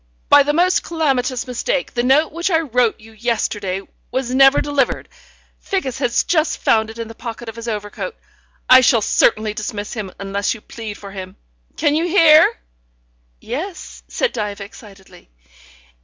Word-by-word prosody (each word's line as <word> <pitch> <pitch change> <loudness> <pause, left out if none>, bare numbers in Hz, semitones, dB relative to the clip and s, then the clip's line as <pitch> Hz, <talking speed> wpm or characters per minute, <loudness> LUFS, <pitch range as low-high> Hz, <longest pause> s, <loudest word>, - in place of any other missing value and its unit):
"By 285 - +8
the 285 +1 +1
most 360 +4 +2
calamitous 270 -6 -1
mistake 255 +2 -2
the 240 - 0
note 270 +6 +3
which 340 +4 -2
I 325 -3 +2
wrote 250 -6 +1
you 220 +1 -15
yesterday 210 -4 -2 0.3
was 255 -1 -2
never 270 +1 +6
delivered. 285 -3 -1 0.5
Figgis 270 - -3
has 245 -3 +1
just 315 -2 +1
found 220 -1 +2
it 225 - -10
in 230 -1 -5
the 225 - -10
pocket 235 0 -8
of 225 - -7
his 230 0 -8
overcoat. 210 - -5 0.5
I 255 0 +8
shall 235 -3 +3
certainly 215 -1 +2
dismiss 210 -1 -5
him 210 -5 -5
unless 200 +2 -2
you 220 - -12
plead 220 -2 -8
for 200 -1 -10
him. 190 -1 -8 0.4
Can 290 - +2
you 320 +3 +1
hear?" 330 -4 +6 0.9
"Yes," 320 - -6
said - - -1
Diva 205 -2 -4
excitedly. 195 - -15
240 Hz, 160 wpm, -19 LUFS, 215-290 Hz, 0.9 s, By